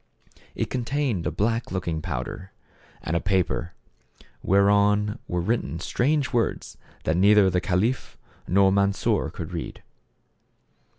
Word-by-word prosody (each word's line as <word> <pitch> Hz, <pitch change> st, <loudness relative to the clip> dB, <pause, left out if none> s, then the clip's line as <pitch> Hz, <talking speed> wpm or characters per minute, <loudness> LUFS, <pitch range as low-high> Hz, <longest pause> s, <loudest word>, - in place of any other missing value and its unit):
It -, -, -3 dB
contained 125 Hz, -, -1 dB
a -, -, -1 dB
black 115 Hz, +7 st, -1 dB
looking 85 Hz, -4 st, -2 dB
powder 95 Hz, +4 st, -5 dB, 0.5 s
and 80 Hz, -, -2 dB
a -, -, +3 dB
paper, 90 Hz, -3 st, -1 dB, 0.7 s
whereon 105 Hz, +2 st, +3 dB
were 90 Hz, 0 st, -1 dB
written 95 Hz, -4 st, -1 dB
strange 140 Hz, -, 0 dB
words 120 Hz, -2 st, -1 dB, 0.3 s
which 80 Hz, -, +1 dB
neither 100 Hz, +1 st, +5 dB
the 90 Hz, 0 st, +1 dB
caliph 105 Hz, +7 st, -1 dB, 0.3 s
nor 95 Hz, +1 st, +4 dB
Mansor 100 Hz, 0 st, +1 dB
could 85 Hz, +1 st, -7 dB
read. 85 Hz, -, -6 dB
100 Hz, 120 wpm, -25 LUFS, 90-110 Hz, 0.7 s, neither